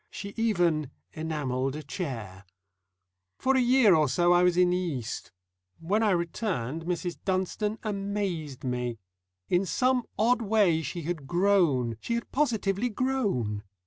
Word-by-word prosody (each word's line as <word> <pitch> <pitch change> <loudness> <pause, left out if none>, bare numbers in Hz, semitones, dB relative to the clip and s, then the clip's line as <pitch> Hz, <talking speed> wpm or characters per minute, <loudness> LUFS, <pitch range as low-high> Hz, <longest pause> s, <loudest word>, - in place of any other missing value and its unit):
She 200 0 -7
even 175 - +1 0.2
enamelled 140 -4 -2
a 155 - -6
chair. 115 - -6 0.9
For 265 +1 +2
a - - +4
year 245 -4 +5
or 155 -4 +3
so 175 +6 +3
I 175 - +5
was 180 -1 +3
in 180 0 +4
the 180 - +2
East. 150 -11 -4 0.5
When 195 +7 0
I 220 - +3
returned 170 - -2
Mrs. 175 0 -3
Dunstone 195 +3 -1
amazed 195 - -3
me. 125 -2 -2 0.5
In 180 +2 +2
some 250 +6 +1
odd 235 +4 +3
way 200 -7 +3
she 160 +3 -5
had 155 -4 -4
grown, 170 - +2
she 235 - -2
had 235 - -4
positively 230 -5 0
grown. 205 - -1
175 Hz, 145 wpm, -28 LUFS, 150-210 Hz, 0.9 s, year